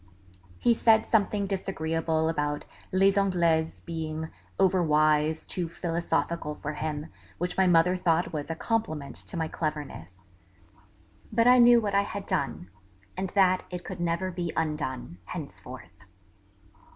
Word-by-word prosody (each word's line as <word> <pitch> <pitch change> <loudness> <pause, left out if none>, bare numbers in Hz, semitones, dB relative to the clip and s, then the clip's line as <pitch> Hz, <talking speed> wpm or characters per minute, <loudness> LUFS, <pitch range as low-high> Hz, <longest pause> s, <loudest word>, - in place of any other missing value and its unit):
He 240 - +3
said 225 -1 +4
something 205 -2 +1
disagreeable 165 -4 -1
about 150 -2 -1 0.3
Les 195 +1 +5
Anglaises 170 -5 +1
being 160 -1 -5 0.3
over 190 -1 +3
wise, 155 0 +2
too 175 -3 -3
philosophical 170 -2 -2
for 150 +1 -5
him, 150 +1 -4 0.3
which 180 +1 -2
my 190 -1 +3
mother 175 +1 +4
thought 170 -2 +1
was 150 0 -4
a 165 - -2
compliment 160 -9 -2
to 180 - -7
my 160 -1 -1
cleverness. 95 - -6 1.0
But 230 +1 +3
I 250 +1 +7
knew 240 0 +8
what 205 -3 -2
I 200 - +4
had 200 0 -5
done, 90 - -2 0.4
and 190 0 -3
that 185 -2 +4
it 180 -1 -6
could 185 -2 -6
never 175 +2 -1
be 175 -2 -3
undone, 150 - -3
henceforth 85 +4 -9
165 Hz, 140 wpm, -28 LUFS, 155-190 Hz, 1.0 s, knew